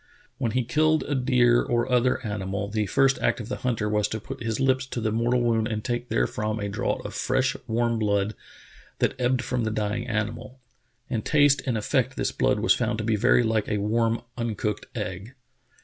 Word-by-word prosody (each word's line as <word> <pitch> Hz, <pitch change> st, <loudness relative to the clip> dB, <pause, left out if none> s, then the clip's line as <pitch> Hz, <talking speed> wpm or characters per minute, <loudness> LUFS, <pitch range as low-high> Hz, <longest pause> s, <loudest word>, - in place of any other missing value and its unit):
When 120 Hz, -5 st, -1 dB
he 125 Hz, 0 st, +1 dB
killed 155 Hz, +6 st, +2 dB
a 145 Hz, -, -3 dB
deer 125 Hz, -2 st, +3 dB
or 120 Hz, 0 st, 0 dB
other 125 Hz, 0 st, +2 dB
animal, 100 Hz, -1 st, -3 dB
the 105 Hz, -1 st, -1 dB
first 135 Hz, +5 st, +3 dB
act -, -, +1 dB
of 115 Hz, 0 st, -7 dB
the 125 Hz, -, -3 dB
hunter 115 Hz, -4 st, -1 dB
was 105 Hz, -1 st, +1 dB
to 110 Hz, -, -4 dB
put 135 Hz, +5 st, -8 dB
his 115 Hz, 0 st, -2 dB
lips 130 Hz, -1 st, +2 dB
to 125 Hz, -, -4 dB
the 110 Hz, -1 st, -1 dB
mor 115 Hz, +2 st, 0 dB
tal 125 Hz, -, +2 dB
wound 115 Hz, -2 st, +1 dB
and 110 Hz, -2 st, -3 dB
take 120 Hz, 0 st, -2 dB
therefrom 105 Hz, -, -1 dB
a 100 Hz, -1 st, -3 dB
draught 100 Hz, -, -2 dB
of -, -, -5 dB
fresh, -, -, 0 dB
warm 115 Hz, 0 st, 0 dB
blood 100 Hz, -1 st, +1 dB, 0.6 s
that -, -, +1 dB
ebbed 125 Hz, +1 st, +1 dB
from 125 Hz, 0 st, -1 dB
the 110 Hz, -, 0 dB
dying 110 Hz, +2 st, -2 dB
animal. 115 Hz, +3 st, -3 dB, 0.5 s
In 115 Hz, -3 st, -2 dB
taste 145 Hz, 0 st, +4 dB
and 125 Hz, -, +1 dB
in -, -, 0 dB
effect 105 Hz, -, 0 dB
this -, -, -1 dB
blood -, -, +1 dB
was -, -, +5 dB
found -, -, -1 dB
to 110 Hz, -, -3 dB
be 110 Hz, 0 st, +1 dB
very 120 Hz, +3 st, +4 dB
like 110 Hz, -2 st, 0 dB
a 105 Hz, -, 0 dB
warm 115 Hz, +3 st, 0 dB, 0.2 s
uncooked 110 Hz, -2 st, -2 dB
egg. 95 Hz, +8 st, -5 dB
115 Hz, 210 wpm, -25 LUFS, 105-125 Hz, 0.6 s, was